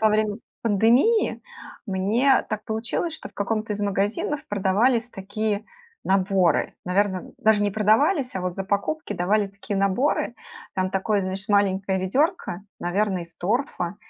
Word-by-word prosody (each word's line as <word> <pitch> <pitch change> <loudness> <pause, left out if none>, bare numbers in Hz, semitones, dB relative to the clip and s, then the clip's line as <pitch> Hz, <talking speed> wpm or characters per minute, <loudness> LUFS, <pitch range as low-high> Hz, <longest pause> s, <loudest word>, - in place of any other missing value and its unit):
во 220 - +5
время 215 -1 +1 0.3
пандемии 235 - +3 0.4
мне 215 +8 +3
так 215 -1 -3
получилось, 225 +9 -2
что - - -8
в - - -26
каком-то 215 +1 -1
из 205 - -5
магазинов 205 +8 -1
продавались 225 +5 +2
такие 205 +2 -3 0.4
наборы. 190 -3 +2
Наверно, 190 +1 +2
н - - -12
даже 220 -1 +3
не 205 - +1
продавались, 245 - +2
а 190 - -2
вот 180 -1 -3
за 195 - -4
покупки 205 +7 -1
давали 200 +3 +1
такие 200 +1 -5
наборы. 215 +5 +1 0.4
Там 185 0 0
такое, 200 +2 +1
значит, 190 +3 -3
маленькое 195 -1 +2
ведерко, 230 - 0 0.2
наверное, 190 +1 0
из 165 -1 -14
торфа, 200 -3 -1
205 Hz, 145 wpm, -24 LUFS, 190-225 Hz, 0.4 s, во